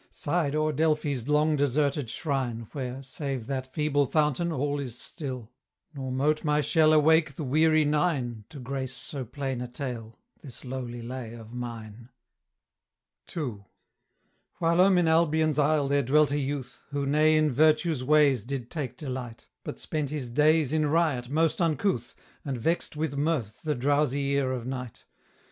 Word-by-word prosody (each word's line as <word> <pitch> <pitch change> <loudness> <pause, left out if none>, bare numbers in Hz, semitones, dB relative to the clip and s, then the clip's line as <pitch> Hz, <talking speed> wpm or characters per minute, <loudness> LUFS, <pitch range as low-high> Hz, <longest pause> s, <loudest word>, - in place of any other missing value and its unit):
sighed 150 -2 -1
o'er 155 0 +1
Delphi's 150 -4 0
long 150 +1 +3
deserted 140 -1 +1
shrine 125 -6 -2
Where, 130 -1 -5
save 135 -2 -4
that 130 0 -4
feeble 145 -2 +1
fountain, 155 +3 +1
all 145 0 -1
is 125 -4 -6
still; 130 -6 -7 0.4
Nor 135 -3 -5
mote 145 +4 +1
my 150 -1 +2
shell 155 +2 +4
awake 155 -1 +4
the 155 - -4
weary 155 +3 +3
Nine 145 -7 0
To 145 - -10
grace 130 0 -4
so 135 +1 -6
plain 130 +1 -4
a 125 - -4
tale 120 -3 -6 0.2
this 130 -3 -10
lowly 125 -2 -5
lay 120 -1 -6
of 115 0 -11
mine. 115 -1 -7 1.3
II. 120 -11 -3 1.0
Whilome 180 +3 +4
in 175 -2 +3
Albion's 160 -2 +3
isle 150 -1 +3
there 140 +1 +2
dwelt 145 +3 +3
a 145 - +1
youth, 135 -2 -4
Who 145 -1 -2
ne 155 +2 +4
in 155 -1 +3
virtue's 155 +1 +3
ways 140 -4 +4
did 125 -1 -5
take 130 -7 -4
delight; 125 -5 -6 0.2
But - - -6
spent 150 -3 -3
his 135 -5 -4
days 150 +2 +3
in 155 -1 +2
riot 145 -6 +1
most 160 +4 +1
uncouth, 155 - 0 0.3
And 135 -3 -3
vexed 165 +3 -1
with 155 -2 -2
mirth 140 -8 -1
the 150 -2 -1
drowsy 140 +1 +1
ear 140 -2 +1
of 125 -3 -3
Night. 125 -2 -6
140 Hz, 160 wpm, -27 LUFS, 125-155 Hz, 1.3 s, shell